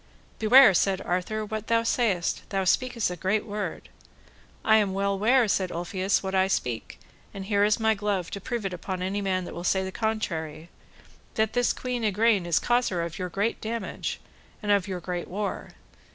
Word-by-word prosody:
Beware, 225 0 +8
said 190 +1 +2
Arthur, 200 +5 -2
what 215 0 -5
thou 230 0 +2
sayest; 215 -7 0
thou 195 -1 0
speakest 235 +1 +1
a - - -4
great 190 +5 0
word. 210 -1 -5 0.8
I 220 0 +6
am 200 -3 +1
well 200 0 0
ware, 240 +3 +4
said 190 -2 0
Ulfius, 185 +4 -1
what 190 0 -3
I 190 0 +3
speak, 125 -11 -2 0.4
and 195 -1 -6
here 200 0 +2
is 210 +2 +3
my 220 0 +3
glove 200 -4 -2
to 200 - -5
prove 235 0 -3
it 190 - -2
upon 180 +1 -4
any 195 +2 -2
man 185 -2 -1
that - - -8
will 175 - -6
say 190 +1 +1
the 190 - -4
contrary, 170 -8 -3 0.6
that 220 0 +1
this 245 -1 +2
Queen 250 -2 -3
Igraine 210 -3 +2
is 170 -2 +2
causer 240 -8 +1
of 170 -1 -6
your 180 0 -3
great 200 +6 -1
damage, 230 +1 -4 0.4
and 205 - +1
of 200 -1 +2
your 185 -2 -4
great 175 0 -4
war. 200 +2 -4
200 Hz, 190 wpm, -26 LUFS, 185-220 Hz, 0.8 s, Beware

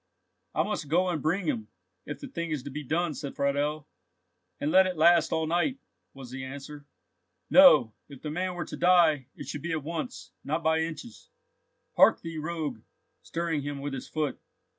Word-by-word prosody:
"I - - +3
must 205 -8 -3
go 180 +4 +2
and 165 -4 -2
bring 175 +5 0
him, 110 -8 -2 0.4
if 145 -2 -6
the - - -7
thing 170 0 -4
is 150 -5 -3
to 140 - -7
be 150 +3 -5
done," 165 +4 0
said 140 0 -6
Friedel. 145 +2 -1 0.7
"And 145 - -1
let 190 +2 +6
it 180 -2 -4
last 170 +2 +5
all 160 -1 +1
night!" 175 - 0 0.4
was 130 -2 -10
the 130 0 -6
answer. 140 +2 -9 0.6
"No, 270 - +7 0.2
if 140 -3 -12
the 150 - -3
man 180 +3 -2
were 175 - -4
to - - -7
die, 165 -7 +4
it - - -9
should 145 - -5
be 170 +2 -3
at 155 -3 -2
once, 235 - -5
not 155 +4 -2
by 160 0 +3
inches. 165 - -6 0.7
Hark - - +6
thee, 165 -1 -6
rogue!" 155 -7 -4 0.4
stirring 165 -3 -2
him 145 0 -4
with 140 0 -4
his 130 - -6
foot. 150 -4 -2
155 Hz, 190 wpm, -28 LUFS, 145-170 Hz, 0.7 s, No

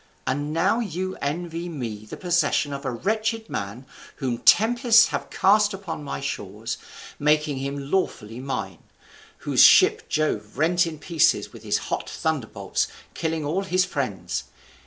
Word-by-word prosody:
And 145 +3 -1
now 165 +8 +2
you 185 -3 -3
envy 170 +4 -3
me 115 -9 -5
the - - -8
possession 175 -4 +1
of 140 - -6
a - - 0
wretched 220 - -1
man 100 +7 -5 0.3
whom 125 -4 -2
tempests 230 0 +5
have - - -4
cast 210 +1 +3
upon 190 -6 -6
my 140 - -4
shores, 115 -4 -5 0.4
making 150 -1 +2
him 140 +1 -5
lawfully 120 - -1
mine; 110 - -4 0.7
whose - - +3
ship - - +6
Jove 105 -9 -1
rent 175 +3 +3
in 160 -2 -6
pieces 155 +1 +1
with - - -11
his - - 0
hot - - -2
thunderbolts, - - -2 0.3
killing 160 -2 -2
all 165 +7 0
his 185 -1 +1
friends. 135 - -3
155 Hz, 145 wpm, -24 LUFS, 135-185 Hz, 0.7 s, ship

